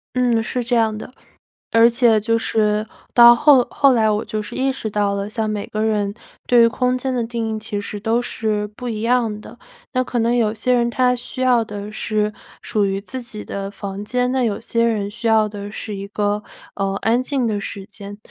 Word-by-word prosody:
嗯， 245 -3 +2
是 245 +2 -3
这 240 +1 0
样 225 -2 +2
的。 235 - -9 0.6
而 230 0 +6
且 235 -2 +3
就 230 +2 +1
是 215 -1 0 0.3
到 240 0 +9
后 285 0 +6
后 275 -2 +4
来 220 -3 +3
我 210 +1 0
就 215 - -3
是 210 +3 -7
意 265 +1 +1
识 245 -4 -4
到 205 -1 0
了， 200 0 -3
像 220 0 -2
每 210 -1 -3
个 215 - -3
人 210 -2 0 0.3
对 240 -1 +5
于 230 - +6
空 250 +2 0
间 260 +1 -2
的 245 -2 0
定 225 -1 -3
义 - - -3
其 215 -1 -4
实 205 0 -5
都 225 +3 +1
是 215 -3 -2
不 245 +4 -8
一 215 -2 -4
样 230 -3 +1
的。 - - -13 0.3
那 255 -1 +1
可 250 -1 -3
能 230 +1 +2
有 225 -3 +1
些 250 +3 0
人 240 -1 +3
他 250 +1 +2
需 250 +1 -6
要 250 -2 +4
的 210 -1 -7
是 215 -1 -1 0.3
属 210 -2 0
于 195 0 -1
自 255 +5 -7
己 225 -3 -8
的 195 0 -5
房 200 0 -6
间， 250 +3 -1
那 260 -1 +1
有 210 -3 -1
些 230 0 -1
人 215 -3 0
需 230 +2 -7
要 220 -1 +4
的 205 -1 -7
是 215 0 -6
一 200 0 -6
个， 205 0 -1 0.3
呃， 195 0 -1
安 235 +3 +2
静 260 -2 -1
的 210 -2 -1
时 195 0 -6
间。 200 0 -10
225 Hz, 240 characters per minute, -20 LUFS, 210-240 Hz, 0.6 s, 到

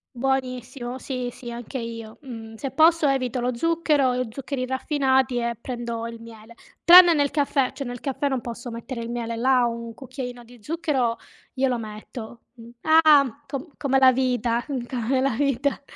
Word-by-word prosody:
Buonissimo 255 -1 -2
sì 250 -2 -4
sì 240 0 -10
anche 240 +2 -6
io, 230 -1 -7
mh. 225 -4 -9
Se 270 +5 -5
posso 320 +1 +4
evito 255 -2 0
lo 245 0 -1
zucchero 305 -3 +2
e 250 -1 -1
zuccheri 270 +2 -4
raffinati 265 -1 +1
e 235 -1 -2
prendo 235 -2 -4
il 230 0 -7
miele. 225 0 -13 0.3
Tranne 350 -1 +9
nel 285 -1 +1
caffè, 280 -3 +1
cioè 275 -3 -6
nel 245 -1 -6
caffè 280 0 -2
non 265 -2 -1
posso 235 +1 -7
mettere 235 +1 -6
il 230 - -6
miele, 235 -1 -3
là 250 +1 +3
un 235 0 -4
cucchiaino 250 -2 -7
di 240 0 -16
zucchero 270 -5 -1 0.3
glielo 255 -2 0
metto, 220 +2 -9
mh. 230 -1 -13
Ah, 295 -4 +5
co 275 +3 -6
come 270 -2 +1
la 260 -1 +7
vita, 245 -2 0
mh, 260 -4 -3
come 255 +1 -1
la 270 0 +2
vita. 275 +3 0
255 Hz, 175 wpm, -24 LUFS, 235-275 Hz, 0.3 s, Tranne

